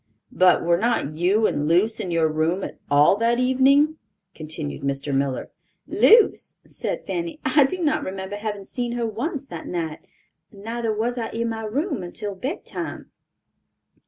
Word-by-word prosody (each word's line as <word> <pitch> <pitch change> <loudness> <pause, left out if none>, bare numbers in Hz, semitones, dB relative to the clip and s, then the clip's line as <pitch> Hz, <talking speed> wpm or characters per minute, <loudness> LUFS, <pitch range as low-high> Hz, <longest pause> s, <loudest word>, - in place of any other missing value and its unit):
"But 180 -1 +4
were 170 0 +2
not 230 -9 0
you 185 +8 +2
and 145 -6 0
Luce 190 +7 +2
in 185 - -3
your 165 -2 +2
room 160 +5 0
at - - -7
all 145 +7 +5
that 230 +2 +2
evening?" 270 +5 +3 0.3
continued 155 -3 -5
Mr. 140 +1 -2
Miller. 135 -1 -1 0.3
"Luce!" 455 -1 +4
said - - -4
Fanny; 335 -3 -4
"I 295 -3 +5
do 355 +6 -3
not 310 0 +1
remember 190 +1 -5
having 205 -2 -5
seen 240 +2 -3
her 240 -1 -1
once 270 - -3
that 165 - -7
night; 165 -3 -3 0.5
neither 225 +3 -3
was 235 +3 -1
I 225 - -3
in 230 0 -2
my 225 -1 -4
room 280 - -2
until 200 +3 -5
bedtime." 260 - -6
215 Hz, 160 wpm, -23 LUFS, 170-250 Hz, 0.5 s, all